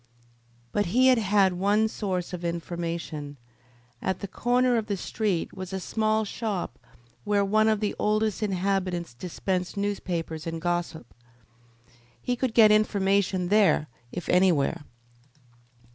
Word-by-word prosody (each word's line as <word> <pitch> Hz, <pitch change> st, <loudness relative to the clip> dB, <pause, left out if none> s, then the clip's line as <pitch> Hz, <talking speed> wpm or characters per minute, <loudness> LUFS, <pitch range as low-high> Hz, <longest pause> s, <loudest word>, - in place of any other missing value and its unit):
But 205 Hz, -2 st, 0 dB
he 250 Hz, +9 st, +3 dB
had 205 Hz, -6 st, +3 dB
one 205 Hz, +4 st, +2 dB
source 190 Hz, -5 st, -3 dB
of 180 Hz, -1 st, -5 dB
information. 170 Hz, -3 st, -4 dB, 0.6 s
At 190 Hz, -1 st, -1 dB
the 200 Hz, -, -5 dB
corner 245 Hz, +4 st, +2 dB
of 220 Hz, -1 st, -2 dB
the 200 Hz, -2 st, -1 dB
street 195 Hz, -2 st, -2 dB
was 185 Hz, 0 st, -7 dB
a 190 Hz, -, -2 dB
small 215 Hz, +2 st, 0 dB
shop 210 Hz, -3 st, -4 dB, 0.4 s
where 205 Hz, -1 st, +2 dB
one 215 Hz, +2 st, +3 dB
of 215 Hz, -1 st, +2 dB
the 210 Hz, -, 0 dB
oldest 215 Hz, 0 st, +1 dB
inhabitants 185 Hz, -, -1 dB
dispensed 180 Hz, -, -3 dB
newspapers 175 Hz, -6 st, -3 dB
and 165 Hz, 0 st, -3 dB
gossip. 175 Hz, -5 st, -3 dB, 1.1 s
He 250 Hz, -, -1 dB
could 250 Hz, -2 st, -2 dB
get 215 Hz, -2 st, +7 dB
information 195 Hz, -3 st, +2 dB
there 195 Hz, -7 st, +3 dB, 0.2 s
if 175 Hz, -, -6 dB
anywhere. 175 Hz, -6 st, +2 dB
195 Hz, 130 wpm, -26 LUFS, 175-215 Hz, 1.1 s, get